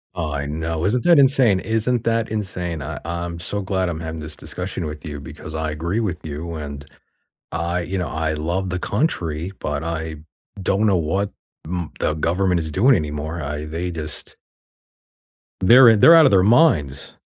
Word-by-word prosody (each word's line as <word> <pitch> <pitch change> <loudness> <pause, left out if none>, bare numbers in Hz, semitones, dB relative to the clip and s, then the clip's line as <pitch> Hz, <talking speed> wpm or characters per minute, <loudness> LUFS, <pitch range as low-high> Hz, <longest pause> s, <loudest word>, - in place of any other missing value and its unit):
I 75 -5 -3
know, 80 +3 -3
isn't 120 +4 +1
that 170 -3 +6
insane 130 -7 +5
isn't 115 +3 0
that 115 -1 0
insane? 90 -6 -3
I 75 0 -5
I'm 85 +1 -4
so 100 +4 -2
glad 95 -2 -1
I'm 80 -2 -4
having 80 -1 -6
this 75 0 -5
discussion - - -5
with 75 -1 -7
you 75 -2 -6
because 75 +3 -9
I 80 -1 -2
agree 85 +8 -2
with 100 -7 -3
you, 80 +3 -5
and 70 -2 -7 0.7
I 85 +1 -1
you 90 +3 -4
know, 90 -3 -2
I 80 0 -2
love 85 +5 -2
the 90 0 -2
country, 90 - -1
but 75 0 -3
I 80 -1 -4 0.5
don't 100 +3 +1
know 100 -3 +3
what 95 +5 -1 0.3
m 85 -1 -4
the - - +1
government 85 +3 +1
is 80 - -3
doing 120 - +4
anymore, 75 +1 -4
I 75 0 -4
they 85 +4 -4
just 75 -3 -6 1.2
They're 120 +6 +8
in 110 -2 +4
they're 165 - +9
out 165 -1 +8
of 135 - +5
their 95 -2 +5
minds. 95 - +3
85 Hz, 180 wpm, -21 LUFS, 75-100 Hz, 1.2 s, they're